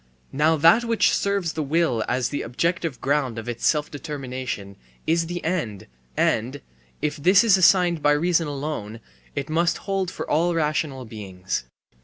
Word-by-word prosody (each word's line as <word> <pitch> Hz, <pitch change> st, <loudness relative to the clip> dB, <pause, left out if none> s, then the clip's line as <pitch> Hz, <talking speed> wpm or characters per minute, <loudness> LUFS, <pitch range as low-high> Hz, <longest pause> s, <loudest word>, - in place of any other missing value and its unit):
Now 155 Hz, +3 st, +3 dB
that 165 Hz, +10 st, +5 dB
which 230 Hz, -1 st, +2 dB
serves 200 Hz, -4 st, 0 dB
the 160 Hz, -, -2 dB
will 150 Hz, -6 st, +1 dB
as 125 Hz, 0 st, 0 dB
the 145 Hz, -, -3 dB
objective 165 Hz, +4 st, -2 dB
ground 135 Hz, -4 st, 0 dB
of 115 Hz, -, -6 dB
its 120 Hz, -1 st, -1 dB
self 150 Hz, -1 st, +1 dB
determination 130 Hz, -9 st, -5 dB, 0.3 s
is 165 Hz, +1 st, +1 dB
the 175 Hz, +1 st, -5 dB
end, 155 Hz, -, -2 dB, 0.3 s
and, 125 Hz, +6 st, +1 dB, 0.4 s
if 150 Hz, -, -1 dB
this 185 Hz, +8 st, +5 dB
is 220 Hz, -5 st, +5 dB
assigned 180 Hz, -3 st, +4 dB
by 145 Hz, 0 st, +4 dB
reason 165 Hz, +1 st, +1 dB
alone, 140 Hz, -7 st, -5 dB, 0.4 s
it 140 Hz, -, -3 dB
must 165 Hz, +2 st, +1 dB
hold 195 Hz, -3 st, -1 dB
for -, -, -6 dB
all 170 Hz, +3 st, +1 dB
rational 150 Hz, -4 st, -1 dB
beings. 95 Hz, -, -5 dB
150 Hz, 160 wpm, -24 LUFS, 130-170 Hz, 0.4 s, that